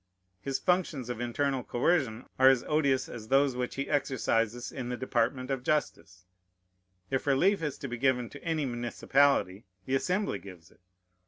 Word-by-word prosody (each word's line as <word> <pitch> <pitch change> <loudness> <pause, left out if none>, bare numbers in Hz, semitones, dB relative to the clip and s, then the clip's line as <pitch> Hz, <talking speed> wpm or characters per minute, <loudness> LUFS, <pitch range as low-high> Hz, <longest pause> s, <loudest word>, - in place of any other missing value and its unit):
His 135 +5 -2
functions 165 -9 0
of 120 -1 -5
internal 135 +2 -1
coercion 125 -4 0
are 130 0 +8
as 130 -2 +3
odious 140 -4 +1
as 110 -2 -9
those 135 0 +3
which 125 0 -3
he 140 +1 -3
exercises 120 -4 0
in 125 -3 -5
the 125 - -3
department 130 +1 -1
of 135 -2 -1
justice. 100 -10 -2 0.9
If 135 +1 -1
relief 170 +8 +3
is 150 -3 -3
to 140 - -6
be 120 -1 -5
given 125 -2 +2
to 145 - -11
any 160 -3 -1
municipality, 120 -3 +1 0.2
the 130 - -3
Assembly 185 +9 0
gives 90 -4 -13
it. - - -25
130 Hz, 165 wpm, -29 LUFS, 120-145 Hz, 0.9 s, are